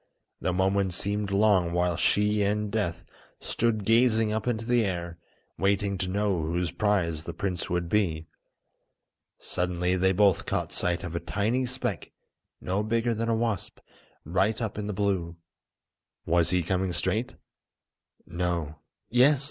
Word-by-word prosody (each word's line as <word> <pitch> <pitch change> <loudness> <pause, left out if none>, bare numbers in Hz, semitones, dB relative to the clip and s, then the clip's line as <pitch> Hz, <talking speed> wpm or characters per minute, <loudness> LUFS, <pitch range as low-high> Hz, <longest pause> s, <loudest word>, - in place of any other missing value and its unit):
The 90 - 0
moments 95 0 +1
seemed 100 +2 -1
long 100 -4 +3
while 90 0 +1
she 105 +4 +2
and 105 +1 0
Death 105 -7 -2 0.4
stood 110 -3 -1
gazing 115 -1 +3
up 110 +2 -2
into 115 -2 -1
the 120 -1 +3
air, 85 -3 -3 0.4
waiting 100 0 +1
to 95 - -1
know 100 -2 0
whose 85 +2 -1
prize 90 -7 0
the 85 - -6
prince 90 -1 -2
would 90 -1 -1
be. 85 -5 0 1.1
Suddenly 90 0 -1
they 95 +1 +3
both 100 -1 +3
caught - - -1
sight 85 -1 -1
of 85 -1 -5
a - - 0
tiny 115 +8 -1
speck 125 -7 -4 0.5
no 95 +3 -1
bigger 115 +2 0
than 115 +1 -2
a 115 - +2
wasp, 110 -4 -2 0.5
right 95 +7 +1
up 110 -3 -3
in 105 - -3
the 105 - -2
blue. 95 -4 -1 0.9
Was 85 0 +2
he 90 -1 +1
coming 95 +1 -1
straight? - - -1 0.9
No! 85 -3 -3 0.3
Yes! 130 +4 +5
100 Hz, 150 wpm, -27 LUFS, 90-105 Hz, 1.1 s, Yes